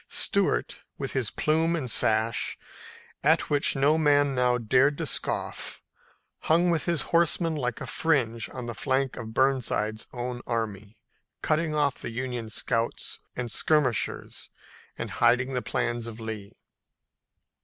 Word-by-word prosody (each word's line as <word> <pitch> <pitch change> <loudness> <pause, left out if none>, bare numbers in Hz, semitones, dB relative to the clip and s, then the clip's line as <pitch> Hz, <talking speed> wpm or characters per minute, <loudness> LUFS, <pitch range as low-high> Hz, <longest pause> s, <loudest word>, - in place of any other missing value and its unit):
Stuart, - - +1
with 135 -1 -4
his 130 -5 0
plume 160 +2 +1
and 145 -6 -3
sash, 110 0 +2 0.7
at - - +3
which 145 0 +3
no 145 +4 +3
man 145 -2 +3
now 125 -1 +2
dared 130 +5 +3
to - - -2
scoff, - - -2 0.6
hung 170 +2 +3
with 165 -2 0
his 170 -4 0
horsemen 165 0 +3
like 125 -5 -2
a - - -4
fringe 120 -8 0
on 125 -2 -6
the 120 - -4
flank 135 +1 -1
of 110 -1 -8
Burnside's 125 -5 +1
own 120 0 -4
army, 110 -2 -3 0.5
cutting 155 0 +1
off 145 -3 +1
the - - -5
Union 120 -1 -4
scouts 115 0 -2 0.2
and 125 -2 -4
skirmishers 145 -2 0 0.5
and - - -5
hiding 125 +3 +2
the 125 - 0
plans 120 -1 -2
of 115 0 -8
Lee. 110 -3 -6
125 Hz, 140 wpm, -27 LUFS, 115-145 Hz, 0.7 s, at